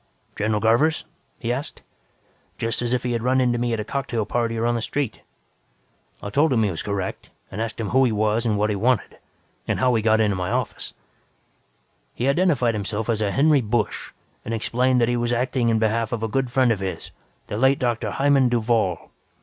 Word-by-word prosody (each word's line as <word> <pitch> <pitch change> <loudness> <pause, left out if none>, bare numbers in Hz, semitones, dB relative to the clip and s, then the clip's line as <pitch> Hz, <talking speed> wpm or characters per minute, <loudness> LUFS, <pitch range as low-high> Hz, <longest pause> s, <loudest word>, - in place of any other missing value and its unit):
"'General 105 0 0
Garvers?' 120 +9 +2 0.3
he 120 0 -2
asked, 135 +4 -5 0.7
just 115 +1 0
as 120 -1 -1
if 125 -1 0
he 125 - -1
had 115 -1 -1
run 130 +2 +2
into 120 -2 +2
me 120 0 0
at 115 - -1
a - - -2
cocktail 120 -2 -2
party 115 +1 -1
or 115 - 0
on 120 - +2
the 120 - -1
street. 135 0 -3 1.0
"I 100 - -5
told 150 +6 +3
him 115 -3 +3
he 105 - +1
was 80 - -3
correct, 100 -2 -4 0.2
and 105 - -4
asked 115 0 -4
him 110 - -2
who 130 +1 +4
he 120 - +1
was 110 +1 +1
and 110 -3 0
what 105 +1 +1
he - - -1
wanted. 120 +4 0 0.5
And - - 0
how 130 -1 +3
he 115 - +2
got 110 0 +3
into 105 -3 +2
my 90 0 -2
office. - - -3 1.2
"He 125 - -1
identified 140 -6 +2
himself 105 +2 -2
as 110 -1 -1
a 105 - +1
Henry 145 +5 +3
Busch 110 -1 -2 0.3
and 115 - -3
explained 125 +3 +1
that 115 - +3
he 120 0 +1
was 120 0 0
acting 125 0 0
in 115 - +2
behalf 110 +1 0
of 115 -2 -3
a - - +1
good 130 +3 -1
friend 130 -1 +3
of 105 - 0
his, 95 -1 -5 0.3
the - - -5
late 135 +5 +3
Dr. 120 -2 -1
Hymann 135 -2 +3
Duvall. 115 -6 0
115 Hz, 215 wpm, -23 LUFS, 110-125 Hz, 1.2 s, who